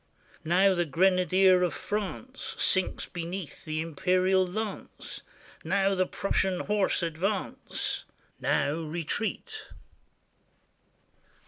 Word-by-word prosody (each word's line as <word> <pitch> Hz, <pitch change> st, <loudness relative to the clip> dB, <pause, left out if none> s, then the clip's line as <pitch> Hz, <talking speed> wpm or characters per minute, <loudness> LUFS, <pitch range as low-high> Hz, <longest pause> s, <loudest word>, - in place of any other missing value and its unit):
Now 185 Hz, +4 st, +4 dB
the 175 Hz, -1 st, +2 dB
grenadier 185 Hz, +2 st, +4 dB
of 175 Hz, -4 st, +1 dB
France 210 Hz, +5 st, -4 dB
Sinks 190 Hz, -1 st, +1 dB
beneath 175 Hz, 0 st, -6 dB
the 155 Hz, 0 st, -1 dB
Imperial 185 Hz, +4 st, +2 dB
lance; 210 Hz, +2 st, -5 dB, 0.4 s
Now 195 Hz, +3 st, +2 dB
the 185 Hz, -1 st, +1 dB
Prussian 190 Hz, -2 st, 0 dB
horse 205 Hz, -3 st, +1 dB
advance, 185 Hz, +5 st, -2 dB, 0.3 s
Now 145 Hz, -, +2 dB
retreat. 170 Hz, -, -3 dB
185 Hz, 90 wpm, -29 LUFS, 170-195 Hz, 0.4 s, Now